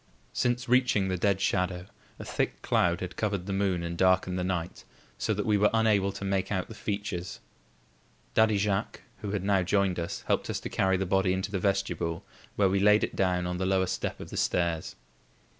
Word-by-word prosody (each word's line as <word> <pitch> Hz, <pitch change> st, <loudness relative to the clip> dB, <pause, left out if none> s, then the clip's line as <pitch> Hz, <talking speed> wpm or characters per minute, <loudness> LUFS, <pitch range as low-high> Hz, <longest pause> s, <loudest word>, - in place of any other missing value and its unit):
Since 120 Hz, 0 st, 0 dB
reaching 125 Hz, -6 st, +3 dB
the 95 Hz, -, 0 dB
dead 100 Hz, 0 st, +2 dB
shadow, 90 Hz, -2 st, 0 dB, 0.3 s
a -, -, -8 dB
thick -, -, -2 dB
cloud 85 Hz, 0 st, +2 dB
had 90 Hz, 0 st, -5 dB
covered 100 Hz, -4 st, -1 dB
the 100 Hz, -, -3 dB
moon 95 Hz, -3 st, 0 dB
and 85 Hz, 0 st, -3 dB
darkened 95 Hz, 0 st, +2 dB
the -, -, -1 dB
night, 90 Hz, -2 st, -3 dB, 0.4 s
so -, -, 0 dB
that -, -, -1 dB
we 105 Hz, -2 st, +2 dB
were 105 Hz, -, +5 dB
unable 105 Hz, -3 st, +3 dB
to 100 Hz, -, -6 dB
make 95 Hz, 0 st, -1 dB
out 95 Hz, -3 st, -1 dB
the -, -, -9 dB
features. 100 Hz, -4 st, -4 dB, 0.9 s
Daddy 110 Hz, -1 st, +4 dB
Jacques, 100 Hz, 0 st, -1 dB, 0.2 s
who 105 Hz, -, -5 dB
had 100 Hz, -2 st, -2 dB
now 100 Hz, -1 st, +3 dB
joined 95 Hz, 0 st, +1 dB
us, 85 Hz, 0 st, -4 dB
helped -, -, 0 dB
us -, -, -2 dB
to -, -, -5 dB
carry 95 Hz, 0 st, +2 dB
the 95 Hz, -, -1 dB
body 95 Hz, 0 st, +2 dB
into 95 Hz, +2 st, -2 dB
the 100 Hz, -, -1 dB
vestibule, 95 Hz, -2 st, -1 dB, 0.3 s
where 100 Hz, -, +3 dB
we 95 Hz, +1 st, +1 dB
laid 105 Hz, +2 st, +5 dB
it -, -, -2 dB
down 90 Hz, -2 st, +1 dB
on 90 Hz, 0 st, -2 dB
the 95 Hz, -, -1 dB
lower 95 Hz, -1 st, +2 dB
step -, -, -3 dB
of -, -, -9 dB
the -, -, -5 dB
stairs. 85 Hz, -2 st, 0 dB
95 Hz, 210 wpm, -28 LUFS, 90-100 Hz, 0.9 s, were